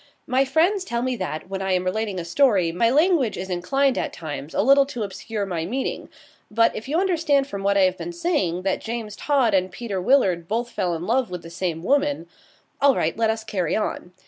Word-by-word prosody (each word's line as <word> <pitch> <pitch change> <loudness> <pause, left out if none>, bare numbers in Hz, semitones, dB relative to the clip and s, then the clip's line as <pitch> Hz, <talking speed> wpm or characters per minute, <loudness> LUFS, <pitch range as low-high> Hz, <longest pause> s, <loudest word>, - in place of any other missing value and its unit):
My 260 +2 +2
friends 340 +8 +2
tell 235 -9 -2
me 255 0 -1
that, 180 -4 -4
when 195 0 -4
I 190 0 0
am 180 0 +1
relating 200 +1 -2
a 170 - -5
story, 190 -4 +3
my 205 +7 +2
language 295 - +2
is 190 0 -5
inclined 265 +10 +1
at - - -2
times 155 -2 -7
a - - +2
little 275 +3 +5
to 245 -6 -4
obscure 205 +1 -4
my 175 -4 -3
meaning; 250 +10 -3 0.4
but, 230 +2 +2
if 220 - -6
you 310 +5 +1
understand 330 -7 +2
from 200 -7 -6
what 200 0 +2
I - - +5
have 185 0 +2
been 345 - -5
saying 300 - -1
that 190 -1 -1
James 225 -2 -5
Todd 265 -6 +1
and 185 -1 +1
Peter 200 -2 -4
Willard 185 -8 +2
both 235 +4 -2
fell 175 -2 -1
in 165 +2 -5
love 245 +2 +1
with 180 -1 -6
the 165 - -10
same 170 -2 -3
woman 285 - +1 0.6
all 280 -1 +5
right, - - 0
let 225 0 +1
us 220 0 -1
carry 185 -7 -1
on. 210 -4 -3
220 Hz, 225 wpm, -23 LUFS, 185-270 Hz, 0.6 s, little